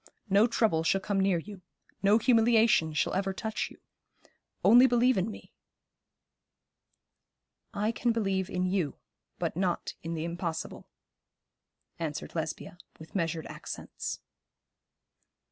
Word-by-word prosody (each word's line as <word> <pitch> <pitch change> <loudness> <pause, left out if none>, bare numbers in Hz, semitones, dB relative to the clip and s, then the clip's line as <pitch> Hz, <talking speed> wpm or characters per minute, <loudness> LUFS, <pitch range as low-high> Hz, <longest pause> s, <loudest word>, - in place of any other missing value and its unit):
No 205 +4 +6
trouble 220 -8 +2
shall 180 +4 +2
come 195 0 -1
near 190 -2 +3
you. 195 +3 -8 0.4
No 200 +2 +5
humiliation 225 -7 +4
shall - - 0
ever 195 0 0
touch 220 +2 -3
you. - - -16 0.9
Only 245 +3 +8
believe 245 +1 +3
in 190 +3 0
me.' 215 - -11 2.2
'I 210 +2 +1
can 235 +1 0
believe 195 -4 -1
in 180 0 -1
you, 180 -6 0 0.4
but - - -2
not 180 -1 -1
in 165 +1 -4
the 160 0 -3
impossible,' 170 -1 -5 1.1
answered 155 -3 -4
Lesbia, 165 +2 -5 0.2
with 160 - -13
measured 165 -4 -1
accents. - - -6
195 Hz, 120 wpm, -29 LUFS, 170-220 Hz, 2.2 s, Only